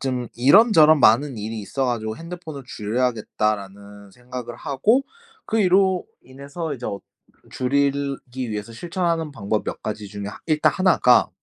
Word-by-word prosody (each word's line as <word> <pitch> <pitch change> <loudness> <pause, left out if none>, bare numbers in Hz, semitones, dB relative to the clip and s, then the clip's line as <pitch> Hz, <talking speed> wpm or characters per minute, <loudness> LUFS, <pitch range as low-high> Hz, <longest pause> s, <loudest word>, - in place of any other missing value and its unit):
좀 125 -3 -2
이런저런 155 - +6
많은 120 +2 +4
일이 110 +1 -5
있어 135 +7 -3
가지고 110 -3 -2
'핸드폰을 165 -4 -8
줄여야겠다.'라는 105 -3 -3
생각을 125 +1 -8
하고 215 - +1 0.4
그 225 0 +1
이로 190 -1 +3 0.2
인해서 140 +4 -6
이제 125 - -7
어 100 - -4 0.5
줄이기 135 -2 -1
위해서 105 +2 -5
실천하는 170 +2 -2
방법 105 -3 -2
몇 - - -5
가지 105 -1 -5
중에 100 0 -7 0.2
일단 155 -2 +2
1 185 -1 +3
가 125 - +5
130 Hz, 310 characters per minute, -22 LUFS, 110-160 Hz, 0.5 s, 이런저런